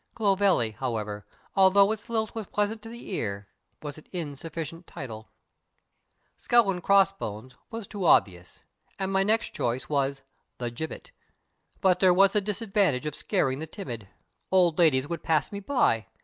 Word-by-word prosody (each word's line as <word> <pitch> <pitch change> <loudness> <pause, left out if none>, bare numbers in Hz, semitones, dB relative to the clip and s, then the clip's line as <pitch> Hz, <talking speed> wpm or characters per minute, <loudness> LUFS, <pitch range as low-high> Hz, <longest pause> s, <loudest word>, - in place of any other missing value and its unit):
Clovelly, 195 - +2
however, 105 -3 -4 0.3
although 195 +1 +6
its 220 0 -5
lilt 220 -2 -1
was 220 -3 -5
pleasant 210 +2 -1
to 225 - -10
the 235 -2 -9
ear, 100 - -3 0.4
was 145 0 -6
an - - -19
insufficient 165 0 -6
title. 115 -8 -8 1.1
Skull 235 -4 +4
and 180 -2 -4
Crossbones 175 - +1
was 225 -2 -6
too 200 -1 -6
obvious, 90 - +2 0.3
and 190 0 -2
my 195 - +3
next 220 +3 +1
choice 120 +2 -2
was 140 -1 0 0.3
The 120 -1 -3
Gibbet. 160 - -6 0.7
But 180 -2 +3
there 185 -1 +5
was 195 +1 +5
the 210 - +2
disadvantage 195 - 0
of 150 - -2
scaring 145 -7 0
the 160 - -5
timid. 120 - -7 0.4
Old 180 -4 +4
ladies 145 -5 +4
would 170 0 -4
pass 155 -3 +1
me 200 - -5
by. 200 - +1
175 Hz, 155 wpm, -27 LUFS, 130-200 Hz, 1.1 s, although